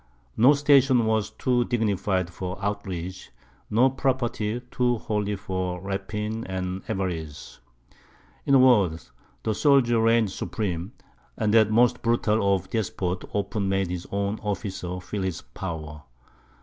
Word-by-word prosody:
No 130 +6 +6
station 140 -4 +4
was 110 -1 +1
too 125 -1 +1
dignified 100 -6 0
for 90 +1 -5
outrage, 95 -3 -4 0.4
no 120 +5 +4
property 120 -4 -1
too 125 -1 +1
holy 105 -1 -2
for 95 -2 -3
rapine 105 +3 -4
and 95 0 -3
avarice. 85 -6 -4 0.9
In 140 - +5
a - - +8
word, 105 -11 +4 0.4
the 110 - 0
soldier 120 -3 +3
reigned 115 -2 +3
supreme; 95 -2 -3 0.4
and 110 -1 +1
that 110 -2 +5
most 120 +3 +3
brutal 110 -4 +2
of 95 0 -6
despots 95 -4 -2
often 100 0 -1
made 95 -2 0
his 90 -1 -5
own 100 +1 -1
officer 95 -3 -4
feel 95 +2 -5
his 95 -3 -3
power. 75 +2 -7
100 Hz, 130 wpm, -25 LUFS, 95-115 Hz, 0.9 s, a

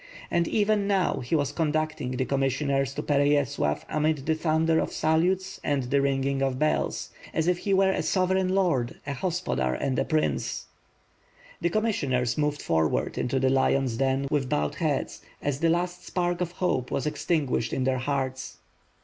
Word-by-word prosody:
And, 170 -1 +2
even 210 -1 +1
now, 195 -2 +1
he 125 +7 -1
was 145 -2 +1
conducting 155 -3 -1
the 130 0 -1
commissioners 135 0 0
to 150 - -3
Pereyaslav 145 - +1
amid 155 -2 0
the 160 - +2
thunder 160 0 +2
of - - -1
salutes 180 +4 +1
and 140 -2 0
the 140 +3 +1
ringing 135 0 0
of 135 -2 0
bells; 155 +3 0 0.2
as 160 +1 +1
if 180 -1 +2
he 200 - 0
were 190 0 +4
a - - -1
sovereign 185 0 +1
lord, 175 -11 +1
a 140 - -3
hos 175 +5 -2
podar 65 - 0
and 130 - 0
a - - +2
prince. 155 -1 -1 1.0
The 170 - +2
commissioners 140 - 0
moved 150 -1 -1
forward 80 -2 0
into 130 +2 0
the 130 0 +2
lion's 135 -2 +2
den 135 +1 +1
with 140 -4 0
bowed 75 -6 0
heads - - -2 0.2
as 140 -1 -2
the 165 - +2
last 175 +1 -1
spark 175 -1 -1
of 175 -1 -2
hope 155 -9 -1
was 135 - -2
extinguished 150 -6 0
in 130 - -1
their 130 0 +1
hearts. 130 -1 -3
145 Hz, 175 wpm, -27 LUFS, 130-175 Hz, 1.0 s, were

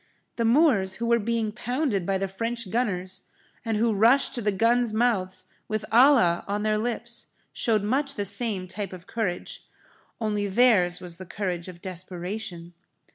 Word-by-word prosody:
The 230 - +1
Moors 225 - +3
who 235 - -3
were 235 0 +3
being 225 0 -1
pounded 245 - -1
by 195 -1 +1
the 195 +1 -2
French 230 +1 -3
gunners 190 -6 -1 0.4
and 225 -2 -1
who 225 +1 +2
rushed 230 +7 +4
to 245 - -1
the 210 -1 +1
guns' 230 +4 +2
mouths 215 -5 0 0.2
with 215 0 -2
'Allah' 230 -8 +5
on 205 +1 -2
their 215 0 +1
lips, 235 +1 -3 0.3
showed 220 -4 +1
much 275 +6 0
the 205 - -2
same 200 -2 +1
type 195 0 -5
of 180 -1 -10
courage. 205 -6 -4 0.6
Only 210 -2 -1
theirs 195 -5 +3
was 175 -2 -8
the 185 - -9
courage 180 -2 -3
of 180 0 -11
desperation. 180 -1 -6
210 Hz, 165 wpm, -26 LUFS, 185-235 Hz, 0.6 s, Allah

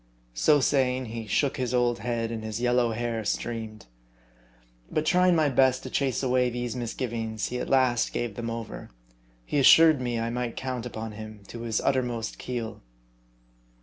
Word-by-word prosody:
So 145 - +4
saying, 130 -2 +1
he 115 -1 -6
shook 140 +5 +1
his 125 -1 -1
old 120 -2 +2
head, 115 0 -2
and 110 -1 -5
his 110 0 -4
yellow 120 -1 +2
hair 115 0 -2
streamed. 110 0 -4 1.0
But 155 - -1
trying 180 +1 +4
my 155 -2 +3
best 130 -1 +3
to - - -7
chase 135 -1 0
away 125 -1 +2
these 120 -1 -4
misgivings, 115 -2 -3
he 125 - -3
at - - -4
last 130 -3 +3
gave 120 -3 -3
them 115 +2 -4
over. 115 -1 -6 0.6
He 145 - 0
assured 155 +1 +7
me 120 -2 -1
I 115 +1 -2
might 120 -1 -3
count 130 -2 -3
upon 110 -1 -6
him 110 -1 -9
to 115 - -7
his 115 -2 -1
uttermost 125 -4 -1
keel. 120 -3 -5
120 Hz, 170 wpm, -27 LUFS, 115-130 Hz, 1.0 s, assured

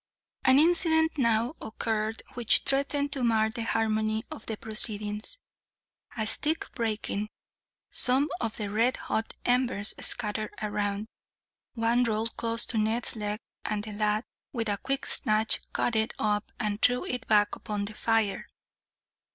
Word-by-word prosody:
An 260 0 +6
incident 320 -1 +4
now 235 +1 +2
occurred 220 0 -2
which 240 -3 +3
threatened 280 +1 +1
to 270 -3 -1
mar 220 -2 +3
the 230 - -5
harmony 220 -1 0
of 220 - -8
the 220 - -2
proceedings. 215 - 0 0.8
A 220 - 0
stick 305 +8 +2
breaking, 215 -2 -2 0.6
some 265 +3 +3
of 230 -2 -3
the 205 -2 -4
red 230 +4 +2
hot 225 - -3
embers 245 -4 +2
scattered 215 -2 0
round. 205 0 -2 0.7
One 235 +1 +2
rolled 225 -1 0
close 230 0 0
to 225 - 0
Ned's 225 +3 0
leg, 210 0 -3 0.2
and 210 -1 -2
the 215 - -6
lad, 210 +1 +1 0.3
with 230 -4 -2
a 205 - 0
quick 275 0 -2
snatch, 215 +1 +1
caught 240 - 0
it 220 0 +1
up 210 0 0
and 210 -2 -2
threw 250 0 +3
it 250 -2 -4
back 210 -1 +4
upon 205 -1 -4
the 215 - -8
fire. 225 -2 0
220 Hz, 145 wpm, -28 LUFS, 215-245 Hz, 0.8 s, An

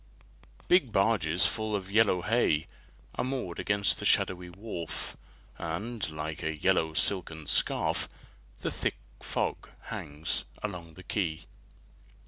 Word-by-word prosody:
Big 175 -10 +5
barges 95 -5 +3
full 110 -1 0
of 95 -1 -4
yellow 100 -4 +4
hay 105 -10 +3 0.5
Are - - -1
moored 125 -9 -3
against 100 -1 +3
the - - -4
shadowy 90 -1 +3
wharf, 90 -3 -5 0.4
And, 95 +5 -3
like 75 0 -4
a 80 -1 -2
yellow 80 -1 +2
silken 80 -4 +1
scarf, - - +2 0.5
The - - -1
thick - - -1 0.2
fog - - -2 0.2
hangs 75 +2 -3 0.2
along 85 -6 -5
the 90 - -11
quay. 80 -7 -1
90 Hz, 120 wpm, -30 LUFS, 80-105 Hz, 0.5 s, Big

